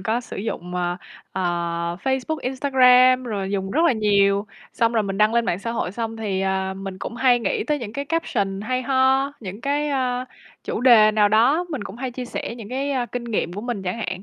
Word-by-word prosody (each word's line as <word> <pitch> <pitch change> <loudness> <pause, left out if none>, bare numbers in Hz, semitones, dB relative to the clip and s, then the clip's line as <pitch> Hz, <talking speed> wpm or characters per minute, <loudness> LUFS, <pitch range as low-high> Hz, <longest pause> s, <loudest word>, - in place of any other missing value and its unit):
có 220 +5 -1
sử 245 - -9
dụng, 180 -4 -5
ờ, 175 0 -1 0.4
ờ, 190 - -2 0.6
Facebook, 265 +4 0
Instagram 255 -1 +4
rồi 200 -5 -3
dùng 195 -1 -2
rất 300 - +1
là 335 - +5
nhiều. 200 -2 +2 0.3
Xong 230 0 +1
rồi 225 -2 +2
mình 195 -1 -4
đăng 215 +2 +3
lên 235 0 +3
mạng 175 - -1
xã 230 +3 -4
hội 230 -6 -2
xong 225 +1 -4
thì, 205 -4 -2
ờ, 190 0 -1
mình 195 -1 -7
cũng 230 - -6
hay 250 -1 +4
nghĩ 215 -2 -1
tới 295 +4 0
những 225 -5 -7
cái 280 +4 -4
caption 205 -11 -1
hay 255 +4 -2
ho, 265 +1 +2
những 200 -1 -7
cái, 290 +3 0
ơ, 255 -3 -1 0.4
chủ - - -3
đề 235 -4 +7
nào 210 -1 +3
đó, 245 +11 +3
mình 270 -10 -4
cũng 200 +2 -8
hay 255 +1 -4
chia 250 +1 -6
sẻ 240 - -5
những 225 -4 -9
cái, 270 +3 -2
a, 250 -3 -1
kinh 245 0 -5
nghiệm 215 -7 -2
của 200 - -5
mình 235 -3 -4
chẳng 180 +1 -3
hạn. 185 -4 -4
230 Hz, 230 wpm, -22 LUFS, 200-255 Hz, 0.6 s, đề